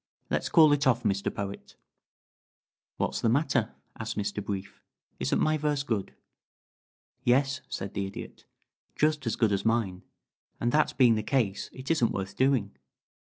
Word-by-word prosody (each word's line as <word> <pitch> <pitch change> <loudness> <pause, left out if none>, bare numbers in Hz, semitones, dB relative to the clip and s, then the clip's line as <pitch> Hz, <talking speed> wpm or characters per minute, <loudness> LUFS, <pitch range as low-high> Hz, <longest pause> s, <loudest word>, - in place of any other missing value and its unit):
Let's - - 0
call 155 -3 +7
it 145 -1 +2
off, 125 - +3
Mr. 100 0 0
Poet." 100 0 -6 1.2
"What's - - -1
the 115 - +2
matter?" 130 -3 +1 0.2
asked 110 -1 -4
Mr. 105 0 -2
Brief. 95 -1 -5 0.4
"Isn't - - +1
my 155 0 +2
verse 145 -1 0
good?" 110 -8 -3 1.1
"Yes," 135 +3 +2
said 95 0 -5
the 100 0 -2
Idiot. 95 - -9 0.5
"Just 150 -4 +1
as 115 - 0
good 110 -3 +2
as 100 -1 0
mine, 110 -5 0 0.6
and 120 - +1
that 150 -2 +2
being 125 -3 +6
the 110 - 0
case 105 -4 0
it 130 +4 -5
isn't 125 -8 +2
worth 95 0 -4
doing. 130 - +1
115 Hz, 155 wpm, -28 LUFS, 100-140 Hz, 1.2 s, call